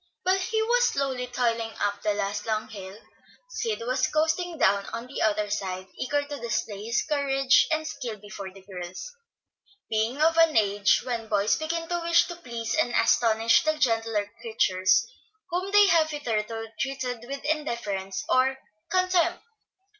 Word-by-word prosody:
While 375 +1 +2
he 440 +4 -1
was - - +3
slowly 265 -3 -1
toiling 230 -2 -1
up 205 0 -1
the 210 -1 0
last 205 +1 -3
long 215 -1 -1
hill, 195 -2 -9 0.5
Sid 450 - -2
was 255 +1 +1
coasting 320 +2 0
down 200 -4 +2
on 230 +1 -5
the 255 - -6
other 210 -1 +1
side, 185 -2 -3
eager 290 +2 -1
to 290 -1 -7
display 215 -3 -3
his 235 +1 0
courage 275 -3 +3
and 315 0 0
skill 245 -8 -5
before 205 -2 -8
the 190 0 -16
girls, 185 - -8 0.8
being 220 +5 0
of 325 +2 +3
an 330 -6 +5
age 205 -1 +3
when 235 -3 -3
boys 205 -1 +2
begin 330 +1 -3
to 345 0 0
wish 335 0 +3
to 345 - -5
please 235 -8 -4
and 310 -7 +1
astonish 225 -1 +4
the 310 0 0
gentler 225 -6 +1
creatures 205 -1 +2 0.5
whom 365 +3 -1
they 415 0 +7
have 320 -3 +4
hitherto 225 -6 -3
treated 260 -3 -3
with 275 +1 -6
indifference 235 -11 -2
or 265 +1 +3 0.3
contempt. 365 -1 +1
235 Hz, 160 wpm, -26 LUFS, 210-310 Hz, 0.8 s, they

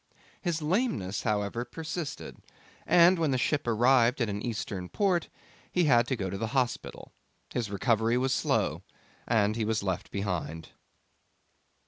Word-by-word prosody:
His 165 -4 -2
lameness, 150 - 0
however, 105 +1 -1
persisted, 160 +5 -6 0.5
and 175 +1 +6
when 160 -2 +2
the 130 - +1
ship 145 +1 0
arrived 120 +2 +4
at 115 -3 0
an 100 0 -3
Eastern 105 -6 -4
port 185 -5 +1 0.4
he 180 - +2
had 120 -6 +4
to 130 - 0
go 100 -5 -3
to 95 +1 -4
the 115 - -1
hospital. 125 -2 -2 0.4
His 115 -4 -2
recovery 115 +3 +1
was 130 +1 +1
slow, - - 0 0.5
and 110 -2 +2
he 115 - -1
was 110 -1 0
left 95 -2 -2
behind. 90 -5 -4
120 Hz, 145 wpm, -29 LUFS, 105-150 Hz, 0.5 s, and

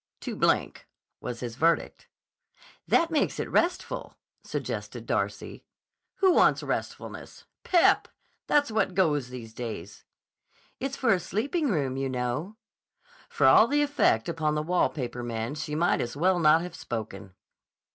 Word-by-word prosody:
"Too - - -5
blank," - - 0 0.3
was 120 -1 -6
his 120 -2 -5
verdict. 165 +3 0 0.8
"That 335 0 +3
makes 305 -3 0
it - - -2
restful," 355 +1 -1 0.3
suggested - - -5
Darcy. - - -3 0.5
"Who 380 -2 +4
wants - - +4
restfulness? - - -5 0.2
Pep! 350 -2 +4 0.4
That's 290 -5 +2
what 195 -4 0
goes 150 -9 +1
these 120 -3 -9
days." 105 -6 -7 0.8
"It's 270 +1 -3
for 235 -5 +3
a 185 - +1
sleeping 275 - -1
room, 140 - -1
you 135 0 -1
know." 130 - -3 0.7
For - - +1
all - - +7
the 290 +1 +2
effect 280 - +2
upon 155 -2 -1
the 150 - -1
wall 180 +3 +2
paper 125 -4 -5
man 115 +1 -3
she 150 0 -4
might 170 +3 +2
as 120 +3 -4
well 180 +3 +2
not 160 +1 +5
have 180 -1 -7
spoken. 100 - -6
155 Hz, 145 wpm, -27 LUFS, -, 0.8 s, all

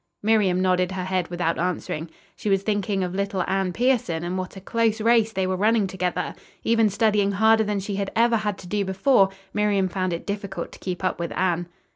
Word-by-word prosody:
Miriam 205 -4 +3
nodded 185 0 +1
her 185 -1 -3
head 185 -1 -1
without 175 -1 -1
answering. 170 -2 -2 0.3
She 210 - -3
was 195 0 +2
thinking 205 -2 0
of 180 0 -3
little 195 -1 -1
Anne 190 -1 0
Pierson 220 -7 +1
and 175 +1 -3
what 185 0 -4
a - - -6
close 225 +2 0
race 225 0 +3
they 190 -2 -1
were 185 0 0
running 215 +2 +2
together. 180 -1 -2 0.3
Even 225 -2 +3
studying 205 -1 +2
harder 220 +2 +4
than 205 -1 -1
she 195 0 -4
had 200 -1 -2
ever 230 0 +4
had 210 -2 -2
to 180 - -11
do 205 +2 0
before, 195 +2 +3 0.2
Miriam 205 -2 +2
found 185 0 -2
it 170 - -4
difficult 200 -3 -4
to - - -13
keep 185 0 -5
up 185 - -1
with 170 -1 -3
Anne. 175 -2 0
195 Hz, 210 wpm, -24 LUFS, 185-210 Hz, 0.3 s, harder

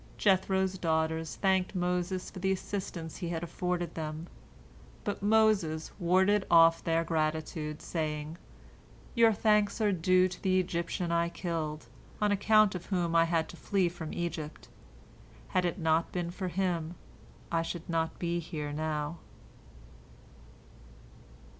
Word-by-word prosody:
Jethro's 190 -1 +2
daughters 160 -1 0
thanked 190 0 +1
Moses 180 +1 -1
for 190 - -8
the 190 +1 +1
assistance 185 -4 -4
he 175 - -4
had 170 -1 -3
afforded 175 -1 -2
them. 155 0 -5 0.8
But 205 - -3
Moses 205 -7 +2
warded 190 +3 +3
off 165 0 +6
their 165 0 +1
gratitude, 155 -1 -2
saying, 155 0 -3 0.7
"Your 230 -1 +5
thanks 210 0 +2
are 210 -2 +3
due 185 +1 +3
to 180 - -9
the 185 -1 +3
Egyptian 170 -1 -2
I 170 0 +2
killed, 160 -5 -4 0.3
on 210 -1 +2
account 215 +1 +4
of 180 -2 -6
whom 175 -4 0
I 165 0 +6
had 165 -1 0
to 175 - -10
flee 190 -1 +1
from 165 -2 -7
Egypt. 165 -3 -5 0.8
Had 185 -1 +1
it 175 - -1
not 160 -1 +1
been 175 -1 -2
for 185 +1 -4
him, 175 -2 -1 0.6
I 165 -1 +2
should 165 0 -5
not 165 -1 -1
be 175 0 -1
here 150 -3 -5
now." 155 +1 -2
175 Hz, 135 wpm, -30 LUFS, 160-190 Hz, 0.8 s, off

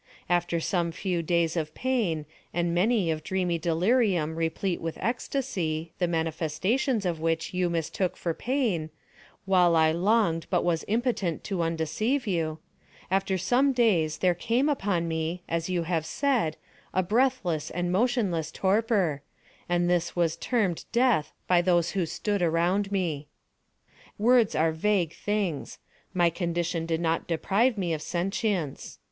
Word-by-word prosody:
After 175 -1 +1
some 170 0 0
few 180 0 -2
days 165 0 +1
of 155 -2 -3
pain, 215 -13 0 0.3
and 175 -1 +1
many 190 -1 +2
of 155 -1 -3
dreamy 180 -1 -1
delirium 175 -1 +1
replete 165 +3 -1
with 165 -1 -4
ecstasy, 195 - -2
the 175 - +2
manifestations 170 - 0
of 170 -3 -1
which 165 +1 -1
you 180 -1 +1
mistook 170 +2 -2
for 170 - -2
pain, 225 - -1 0.6
while 180 -3 +4
I 160 -1 +4
longed 170 -2 +1
but - - +1
was 170 -2 0
impotent 220 - -1
to 195 -4 -2
undeceive 165 - -1
you—after 180 +2 -3
some 250 +9 +2
days 190 -11 +2
there 180 -1 +3
came 240 - +1
upon 195 - 0
me, 165 +2 -2
as 165 +1 -2
you 175 -2 0
have 165 -2 -1
said, 245 - 0 0.4
a 185 - +3
breathless 210 - +1
and 175 +1 -2
motionless 195 - +1
torpor; 195 - +1 0.5
and 175 0 +2
this 175 -1 0
was 170 -2 +1
termed 200 -5 -1
Death 235 -9 +2 0.2
by 180 -1 +4
those 175 -2 +2
who 185 -4 -1
stood 205 +3 -2
around 175 +4 +1
me. 165 -7 -1 0.9
Words 235 0 +4
are 160 +1 +3
vague 175 0 +1
things. 205 -8 -2 0.3
My 175 -2 +3
condition 170 -1 -2
did 165 0 -1
not 165 -1 0
deprive 205 +8 +1
me 175 -4 -1
of 155 - -3
sentience. 180 - -2
175 Hz, 140 wpm, -27 LUFS, 165-205 Hz, 0.9 s, while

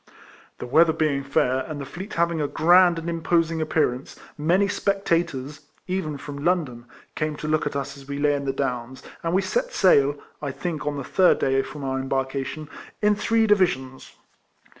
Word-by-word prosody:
The - - -6
weather 160 +6 +4
being 145 -4 0
fair, 130 -1 +1
and 155 -2 -6
the 140 - -5
fleet 185 +9 -8
having 170 -1 +1
a 145 - 0
grand 175 +3 +5
and 165 0 -5
imposing 165 -1 0
appearance, 150 -5 -1 0.2
many 175 +7 +2
spectators 170 -9 -1 0.2
(even 180 -6 -3
from 145 0 -8
London) 150 -10 0 0.3
came 155 -1 -2
to 150 - -6
look 155 -1 +1
at 145 - -5
us 140 0 -3
as 135 0 -14
we 140 0 -4
lay 145 0 +2
in 140 -1 -2
the 135 - +1
Downs, 130 -2 -4 0.2
and 165 - -2
we 195 - +2
set - - -1
sail 145 -7 +4 0.2
(I 145 - -3
think 150 +2 -4
on 145 -1 -1
the 140 - -4
third 185 +6 +4
day 135 0 +2
from 145 +1 -8
our 135 0 -1
embarkation) 135 +3 -3 0.4
in 210 0 +5
three 225 +2 +2
divisions. 175 -11 0
150 Hz, 180 wpm, -24 LUFS, 140-170 Hz, 0.4 s, grand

